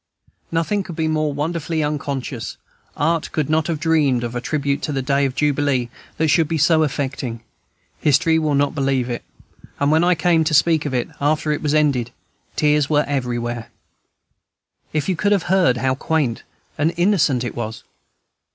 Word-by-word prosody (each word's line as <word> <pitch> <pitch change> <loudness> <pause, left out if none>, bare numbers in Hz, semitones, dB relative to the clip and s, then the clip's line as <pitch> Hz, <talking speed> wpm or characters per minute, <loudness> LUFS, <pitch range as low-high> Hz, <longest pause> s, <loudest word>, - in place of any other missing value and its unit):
Nothing 165 +5 0
could 180 -3 -8
be 160 0 0
more 155 -1 0
wonderfully 160 +2 -2
unconscious; 140 -4 -4 0.4
art 165 +2 0
could 155 -1 -1
not 155 -1 +2
have 165 -3 -2
dreamed 150 -6 +2
of 120 0 -4
a 120 - -3
tribute 140 0 -1
to - - -3
the 135 -2 -2
day 140 +1 +2
of 130 -1 -2
jubilee 145 -4 +1 0.3
that 160 0 +1
should 160 +1 +3
be 165 +1 -1
so 160 +1 +4
affecting; 135 -5 -2 0.6
history 160 +3 +3
will 155 -2 0
not 140 0 +1
believe 135 -4 0
it; 120 - -4 0.6
and 140 +1 +2
when 160 +2 +4
I 180 0 +4
came 165 -1 +3
to 155 -1 +2
speak 155 0 +3
of 130 - -3
it, 120 - 0
after 150 +1 +1
it 150 - -1
was 150 -1 0
ended, 140 -6 +2 0.5
tears 150 -1 +2
were 150 -1 +3
everywhere. 120 -4 -3 1.2
If 155 -2 -1
you 190 - +1
could 205 +5 +2
have 195 -4 +1
heard 180 -10 +3
how 130 +2 +1
quaint 135 -3 -1 0.4
and 160 +3 +1
innocent 170 - +2
it 120 - -4
was! 110 -1 -5
150 Hz, 180 wpm, -20 LUFS, 135-160 Hz, 1.2 s, so